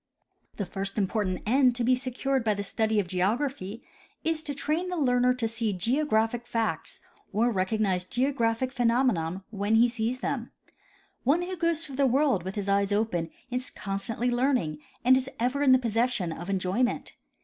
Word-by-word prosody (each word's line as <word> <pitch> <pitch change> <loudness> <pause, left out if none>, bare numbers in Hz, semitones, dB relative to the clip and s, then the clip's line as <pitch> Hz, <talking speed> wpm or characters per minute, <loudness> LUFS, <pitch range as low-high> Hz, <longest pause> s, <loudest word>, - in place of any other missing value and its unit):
The 200 - -3
first 195 +3 -5
important 195 -2 -1
end 250 +2 +4
to 245 - -1
be 250 +2 +4
secured 260 +1 -1
by 215 -2 +1
the 200 - -3
study 220 +2 +1
of 200 - 0
geog 185 +5 +1
raphy 245 -6 -4 0.4
is 320 -1 0
to 290 -3 -4
train 310 +6 -1
the 360 - -3
learner 250 -3 +3
to 240 -3 -1
see 225 -2 -1
geographic 235 - +1
facts 230 -2 -2 0.3
or 230 +4 +2
recognize 190 -2 0
geographic 245 +2 0
phenomena 230 -9 +1
when 205 +1 0
he 235 +2 +6
sees 240 +1 -2
them. - - -2 0.7
One 300 +8 +3
who 370 +1 -4
goes 335 -1 0
through 270 -2 -8
the 280 -1 +4
world 265 -5 +2
with 190 +3 -6
his 205 -2 -3
eyes 200 0 +2
open 205 -6 0 0.2
is 250 +1 -2
constantly 215 +5 -2
learning 240 - +1 0.3
and 260 +1 +7
is 260 0 0
ever 255 +4 0
in 280 -2 +5
the 260 - +8
possession 230 -6 0
of 175 +3 -7
enjoyment. 195 +6 0
235 Hz, 175 wpm, -27 LUFS, 200-260 Hz, 0.7 s, the